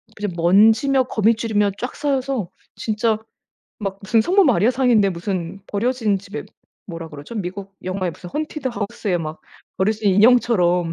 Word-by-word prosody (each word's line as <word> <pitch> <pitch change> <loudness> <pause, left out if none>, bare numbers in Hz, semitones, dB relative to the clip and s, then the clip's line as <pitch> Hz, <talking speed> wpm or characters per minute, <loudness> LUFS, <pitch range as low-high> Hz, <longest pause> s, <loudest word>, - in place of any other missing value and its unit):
그냥 205 -2 -3
먼지며 220 +10 +4
거미줄이며 220 -2 +1
쫙 250 - -4
쌓여서 270 -8 -1 0.3
진짜 220 0 0 0.6
막 195 -1 -4
무슨 225 +3 +3
성모 375 - +4
마리아상인데 240 -4 +3
무슨 180 +1 -4
버려진 220 -1 0
집에 200 +3 -7 0.4
뭐라 165 -3 -7
그러죠? 150 +9 -10
미국 195 +1 -5
영화에 185 -1 -2
무슨 175 - -11
헌티드 305 - -4
하우스의 205 -3 -2
막 155 -1 -6 0.4
버려진 205 0 +1
인형처럼 185 -6 +4
210 Hz, 335 characters per minute, -21 LUFS, 185-235 Hz, 0.6 s, 먼지며